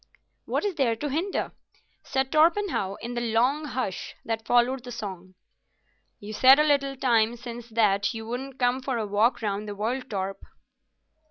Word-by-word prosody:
"What - - -1
is 405 - 0
there 260 -8 +1
to 295 +6 -4
hinder?" 335 +8 -2 0.5
said 265 0 -1
Torpenhow, 320 - +2
in 235 +1 -5
the 240 - -2
long 245 +6 +1
hush 255 -9 -4
that 225 -1 -3
followed 245 +1 +3
the 250 - -8
song. 185 -5 -7 0.8
"You 210 +1 -8
said 260 +5 +7
a 300 - +4
little 280 -2 +2
time 235 -3 +2
since 235 0 -8
that 205 -3 +2
you 225 -2 -6
wouldn't 260 +3 -5
come 250 0 +1
for 255 -1 -2
a 220 - -1
walk 210 +4 +1
round 205 0 -2
the 205 - -5
world, 245 +6 -3
Torp." 195 -1 -3
240 Hz, 170 wpm, -26 LUFS, 215-265 Hz, 0.8 s, said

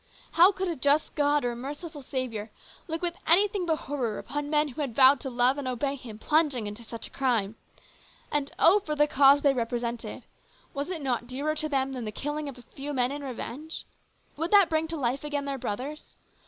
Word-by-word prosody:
How 350 +4 +7
could 380 -1 -3
a 340 - -1
just 285 +3 +2
God 290 -2 +2
or 245 - +1
a - - -6
merciful 290 +5 -7
Saviour 245 -5 -4 0.4
look 325 +1 -3
with 345 -1 +1
anything 390 +2 +3
but 320 - +3
horror 250 -7 -2
upon 290 0 -4
men 300 0 +2
who 275 +3 -6
had 260 -6 -3
vowed 265 0 +7
to 265 - -4
love 250 +3 +2
and 275 - -4
obey 255 +2 -1
Him, 250 -6 -9
plunging 290 -2 +1
into 210 +3 -7
such 230 0 -7
a - - -10
crime? 230 -6 0 0.8
And, 290 -1 0
oh, 370 +6 +6
for 305 -6 -4
the 295 0 +4
cause 285 -1 +5
they 280 -2 +5
represented! 235 -1 -3 0.5
Was 285 +3 -3
it 335 -5 -4
not 240 -3 -1
dearer 280 +5 -2
to 310 0 -2
them 270 -1 0
than 250 -3 -4
the 215 - -3
killing 295 +5 -3
of 265 - -10
a 245 - -13
few 280 +5 -6
men 250 -1 +1
in 290 0 -5
revenge? 275 +4 -6 0.5
Would 330 +3 -1
that 400 -3 +6
bring 315 0 +1
to 330 0 -4
life 265 0 -1
again 290 -1 -2
their 275 -1 -3
brothers? 260 +8 -5
280 Hz, 215 wpm, -28 LUFS, 250-305 Hz, 0.8 s, How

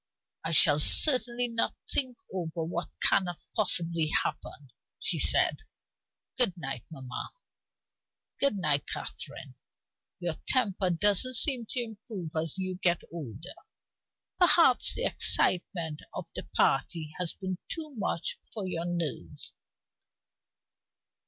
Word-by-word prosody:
"I 160 - -3
shall 150 -2 +6
certainly 245 - +5
not 230 -1 -1 0.2
think 255 -4 0 0.2
over 170 -3 -4
what 170 +2 -4
cannot 175 -3 +3 0.2
possibly 170 -6 +2
happen," 140 -3 -3 0.3
she - - -1
said. - - +4 0.8
"Good 195 -8 +4
night, 135 -6 -5
mamma." 130 -6 -7 1.1
"Good 280 -6 +4
night, 150 -7 +1
Catherine. - - -5 0.7
Your 175 -3 -3
temper 205 -7 +1
doesn't 205 +8 +2
seem 245 -2 +2
to 250 -3 -1
improve 215 -6 -8
as 160 +1 -1
you 185 -1 -4
get 175 -2 +1
older. 155 - -8 0.9
Perhaps 335 -7 +5
the - - -3
excitement 170 -4 +1 0.2
of - - -5
the - - -7
party 155 +3 0
has 180 -2 -2
been 185 -1 -5
too 310 -3 -5
much 190 -6 -3
for 210 -4 -5
your 170 -2 -2
nerves. 165 - -4
180 Hz, 115 wpm, -28 LUFS, 160-225 Hz, 1.1 s, shall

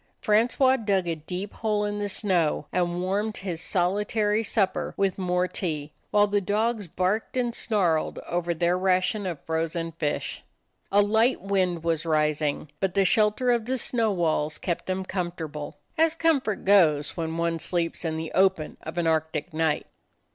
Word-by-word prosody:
Francois 245 +4 +3
dug 200 -6 0
a 170 - 0
deep 180 +5 -6
hole 210 -2 0
in 205 0 -3
the 205 0 -2
snow, 180 -7 +1
and 175 0 0
warmed 205 +3 -1
his 180 -4 -4
solitary 210 +4 +1
supper 195 -4 0
with 195 -1 0
more 180 0 +1
tea, 155 -5 -4 0.2
while 205 0 +4
the 205 0 +1
dogs 210 +1 0
barked 185 +9 -1
and 240 -2 0
snarled 180 -10 +1
over 175 0 -1
their 170 +1 +1
ration 185 +2 +1
of 170 -5 -4
frozen 165 +1 -2
fish. 155 -2 -3 0.5
A 205 +1 +5
light 220 +5 +3
wind 185 -4 0
was 165 -2 0
rising, 150 -2 0
but 190 -1 -1
the 195 -1 +4
shelter 215 +5 +3
of 235 -2 +1
the 260 +2 -1
snow 230 -3 +1
walls 155 -4 0
kept 170 -3 -3
them 185 0 -2
comfortable, 170 -5 -5 0.2
as 325 0 +4
comfort 285 - +1
goes 160 -7 +4
when 165 -1 -3
one 170 0 0
sleeps 170 0 -2
in 160 -1 -2
the 160 0 -4
open 190 -4 +2
of 160 +2 -8
an 175 - +1
Arctic 160 +1 -1
night. 160 -1 0
185 Hz, 165 wpm, -26 LUFS, 165-210 Hz, 0.5 s, A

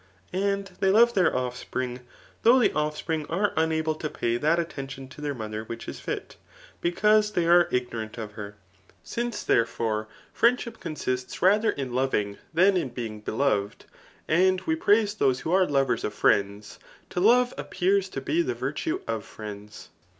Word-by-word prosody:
And 200 0 -1
they 190 - +3
love 235 +4 +5
thdr 185 -5 +3
o&pring, 125 0 -3 0.4
though 240 +3 +6
the 245 - +3
offspring 150 +1 -2
are 195 +5 0
unable 160 0 +1
to 155 0 -5
pay 115 -4 -1
that 155 +6 +2
attention 135 -5 -5
to 150 - -12
their 145 -1 -2
mother 110 -2 -5
which 115 +1 -8
is - - -6
fit, - - -5 0.4
because 210 +4 +3
they 175 -3 +1
are 175 +1 +6
ignorant 120 -3 -3
of 110 -2 -6
hen 100 -1 -8 0.5
Since, 235 -2 -3
therefore, 115 -2 0 0.3
friendship 235 -1 +1
censists 130 -6 -4
rather 210 +4 +4
in 130 -3 -3
loving 110 -6 0
than 185 +4 +4
in 155 -7 -1
being 115 -3 -6
beloved, 105 -3 -1 0.4
and 185 +3 +3
we 320 - 0
pndse 210 -7 +2
those 130 -2 +2
who 160 - -3
arg 185 -1 +4
lovei^ 135 -1 +1
of 105 - -3
friends, 100 +1 +1 0.3
to - - -2
love 245 +5 +4
appears 190 +1 0
to - - -5
be 335 +2 +1
the 335 - -2
virtue 335 +3 -3
of 110 -2 -3
friends. 105 -1 -10
155 Hz, 165 wpm, -26 LUFS, 120-195 Hz, 0.5 s, though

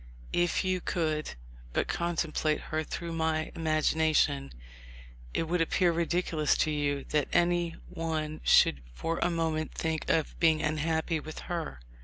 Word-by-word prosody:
If 175 +2 +2
you 185 -1 0
could 155 -4 -1 0.4
but - - +1
contemplate 165 -3 0
her 155 0 -3
through 170 +2 -5
my 160 -1 0
imagination, 155 - +2 0.8
it - - 0
would 170 +1 0
appear 175 +2 +3
ridiculous 165 -2 +1
to 155 - +2
you 145 -2 0
that 150 -2 +1
any 175 -1 +2
one 155 -2 -3
should 70 - +5
for 165 - -2
a 175 - +2
moment 160 -2 -1
think 160 -1 -2
of 160 -2 0
being 160 -2 +4
unhappy 160 +1 0
with 155 +1 -8 0.2
her. 160 - -4
160 Hz, 140 wpm, -30 LUFS, 155-170 Hz, 0.8 s, should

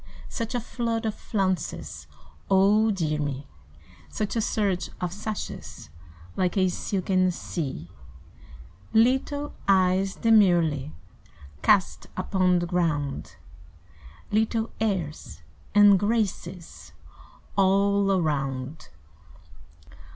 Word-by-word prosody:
Such 230 +1 -4
a - - +1
flood 230 -1 -3
of 220 - 0
flounces! 190 -4 -3 0.4
(Oh 200 +3 +4
dear 160 -7 -1
me!) 145 -1 -3 0.6
Such 215 +1 -3
a 225 - +1
surge 200 -4 0
of 180 -1 -3
sashes 205 - -6 0.4
Like 180 +1 0
a 185 -1 +3
silken 185 0 0
sea. 145 - -4 1.1
Little 265 +5 +2
eyes 190 0 +3
demurely 175 - +3 0.7
Cast 195 -3 +2
upon 185 -1 +2
the 175 - 0
ground, 150 - -1 1.0
Little 220 +1 +1
airs 170 - -3 0.3
and 205 -2 +7
graces 195 -5 -3 0.6
All 200 +1 +3
around. 145 -5 -2
190 Hz, 90 wpm, -26 LUFS, 170-210 Hz, 1.1 s, and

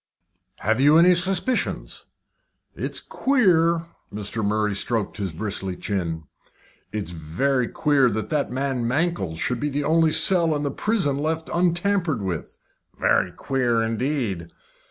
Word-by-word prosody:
"Have 110 +4 +1
you 145 +3 +6
any 180 +2 +6
suspicions?" 185 +7 0 0.7
"It's - - -2
queer." 170 -11 +2 0.3
Mr. 105 +2 -3
Murray 105 0 0
stroked 105 +1 -1
his 100 -4 -3
bristly 95 +1 -3
chin. 85 -5 -3 0.7
"It's 105 -5 -4
very 115 - -1
queer 140 -1 +2
that 110 0 -3
that 150 -3 0
man 130 -2 -2
Mankell's 130 - -1
should 125 +7 -2
be 150 - -1
the 145 +1 -2
only 160 +1 +3
cell 165 0 +5
in 145 - -2
the 140 - -1
prison 155 -8 0
left 160 +2 -2
untampered 175 - +1
with." 90 -4 -5 0.4
"Very - - +2
queer, 120 -4 0
indeed." 115 - -2
135 Hz, 135 wpm, -23 LUFS, 105-165 Hz, 0.7 s, you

